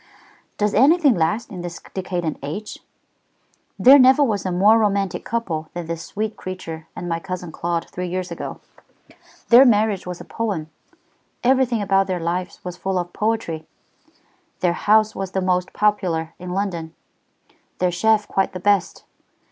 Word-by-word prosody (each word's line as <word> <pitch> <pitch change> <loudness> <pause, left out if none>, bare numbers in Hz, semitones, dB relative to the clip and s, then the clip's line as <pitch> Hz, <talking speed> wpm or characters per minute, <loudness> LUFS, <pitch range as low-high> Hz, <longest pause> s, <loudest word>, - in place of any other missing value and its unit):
"Does 210 -1 +1
anything 285 - +5
last 175 +6 -1
in 180 -3 -6
this 175 0 -6
decadent 180 -4 -3
age? 160 +10 -6 1.0
There 275 +3 +8
never 260 +3 +6
was 210 -7 -1
a - - -1
more 205 +5 +5
romantic 200 -4 0
couple 170 -10 -3
than 175 -1 -4
that 165 +1 -4
sweet 210 +6 -4
creature 165 -4 -7
and 175 - -6
my 165 -1 -1
cousin 180 -1 -6
Claude 170 +1 -2
three 180 0 -5
years 185 +1 -4
ago. - - -6 0.9
Their 240 +3 +9
marriage 210 -6 +2
was 180 -1 -5
a - - -10
poem, 195 -9 -3 0.7
everything 250 -3 +2
about 195 -1 +2
their 185 -2 -2
lives 175 +2 -3
was 180 -1 -6
full 190 -1 -2
of 175 -1 -3
poetry, 210 -8 -2 0.9
their 175 -2 +2
house 215 +4 +3
was 190 -1 -5
the 190 - +1
most 180 -1 0
popular 180 -6 0
in 180 0 -7
London, 180 -4 -3 0.8
their 180 0 +1
chef 215 +4 +2
quite 195 - 0
the 185 - -5
best. 200 -1 +1
185 Hz, 155 wpm, -21 LUFS, 175-215 Hz, 1.0 s, Their